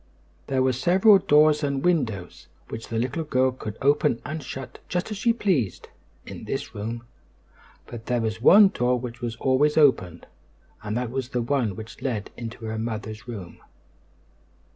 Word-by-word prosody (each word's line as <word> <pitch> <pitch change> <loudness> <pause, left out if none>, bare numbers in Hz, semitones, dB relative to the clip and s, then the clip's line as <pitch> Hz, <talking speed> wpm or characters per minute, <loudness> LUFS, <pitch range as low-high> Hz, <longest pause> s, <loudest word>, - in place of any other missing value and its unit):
There 130 -1 +1
were 130 0 +2
several 190 - +5
doors 150 -4 +4
and 140 0 -1
windows, 115 - -1 0.2
which 115 - -7
the 115 - -3
little 125 +8 -1
girl 130 -3 +1
could 110 -4 -7
open 140 -4 +3
and 155 +3 -4
shut 135 0 -8
just 180 +4 -2
as 210 - -4
she 230 +3 +2
pleased, 185 - -1 0.4
in - - -9
this - - -4
room; 115 +3 -5 0.8
but 115 -2 -10
there 125 -1 +1
was 110 -1 -3
one 200 - +8
door 125 -8 0
which 120 0 -8
was 120 -2 -3
always 135 +5 +2
open, 90 - +3 0.6
and 105 +2 -3
that 125 -2 -3
was 130 -1 -3
the 125 -3 -1
one 120 -6 0
which 110 +2 -10
led 115 -6 -3
into 115 -1 -7
her 110 0 -3
mother's 110 -1 -5
room. 100 -8 -8
125 Hz, 165 wpm, -25 LUFS, 110-150 Hz, 0.8 s, one